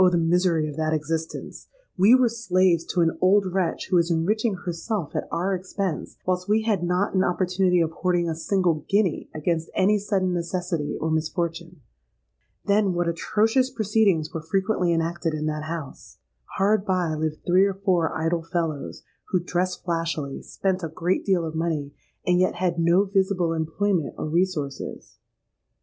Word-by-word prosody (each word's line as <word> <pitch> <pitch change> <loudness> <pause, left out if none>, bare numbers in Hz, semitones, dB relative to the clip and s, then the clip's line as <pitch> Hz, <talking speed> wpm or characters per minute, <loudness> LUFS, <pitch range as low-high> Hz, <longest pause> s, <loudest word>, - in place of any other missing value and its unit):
the 175 - +1
misery 170 -1 +2
of 150 - -6
that 155 0 0
existence! 160 +1 -4 0.3
We 200 +6 +6
were 255 -1 +4
slaves 185 -7 +2
to 180 - 0
an 165 -1 +1
old 195 +2 +4
wretch 185 -2 -1
who 180 - +5
was 170 0 +2
enriching 205 +6 +1
herself 175 0 -4
at - - -2
our 185 +3 0
expense, 185 -2 -4
whilst 180 +1 -1
we 220 +1 +3
had 215 -5 +1
not 180 +3 0
an 190 -1 +3
opportunity 180 0 +2
of 165 -1 0
hoarding 175 0 0
a 165 - -1
single 165 -2 0
guinea 200 -5 +1
against 160 +1 -2
any 205 +3 +3
sudden 195 -3 0
necessity 175 -3 -2
or 160 - -1
misfortune. 165 +1 -2 0.8
Then, 200 -2 +2
what 175 0 0
atrocious 220 +9 +1
proceedings 210 -9 +1
were 165 - -3
frequently 185 +2 0
enacted 165 0 -1
in 155 0 -3
that 155 0 -2
house! 160 -3 -7 0.4
Hard 200 +1 +3
by 185 -5 0
lived 155 0 -3
three 185 +2 +5
or 200 -1 -1
four 185 -4 +1
idle 165 +1 0
fellows, 165 -3 -3 0.2
who 185 - +1
dressed 180 +1 -2
flashily, 165 -5 -2
spent 190 -1 -2
a 165 - -2
great 175 +4 -1
deal 185 -4 +2
of 160 - -5
money, 160 -3 -2 0.3
and 180 0 +3
yet 185 - +2
had 175 -2 -1
no 170 +3 +4
visible 190 -3 +1
employment 165 +1 -1
or - - -3
resources. 160 -4 -2
175 Hz, 165 wpm, -24 LUFS, 165-190 Hz, 0.8 s, We